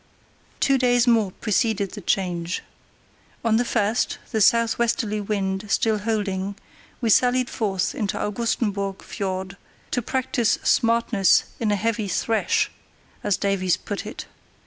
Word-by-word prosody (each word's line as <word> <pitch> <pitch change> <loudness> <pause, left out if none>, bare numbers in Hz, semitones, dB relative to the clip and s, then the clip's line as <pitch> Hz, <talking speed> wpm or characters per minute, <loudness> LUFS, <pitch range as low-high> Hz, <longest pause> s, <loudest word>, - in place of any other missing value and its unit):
Two 275 -2 +3
days 245 -1 +3
more 225 -5 +3
preceded 215 -1 0
the 205 - -8
change. 175 -1 -1 0.8
On 220 -1 +4
the 240 - +2
first, 225 -1 0
the 220 - 0
southwesterly 230 -1 +2
wind 195 -1 -2
still 220 0 +2
holding, 200 -2 -2 0.5
we 230 -2 +2
sallied 250 +2 +3
forth 195 -4 -1
into 205 -3 -2
Augustenburg 205 -3 -2
Fiord, 190 0 -4 0.3
"to 245 - 0
practise 255 -1 0
smartness 230 -4 +3 0.2
in 220 -3 +1
a - - +3
heavy 220 +1 -1
thresh," 330 - +1 0.5
as 200 - +1
Davies 195 -3 +1
put 205 0 -5
it. 215 - -7
215 Hz, 125 wpm, -23 LUFS, 195-230 Hz, 0.8 s, On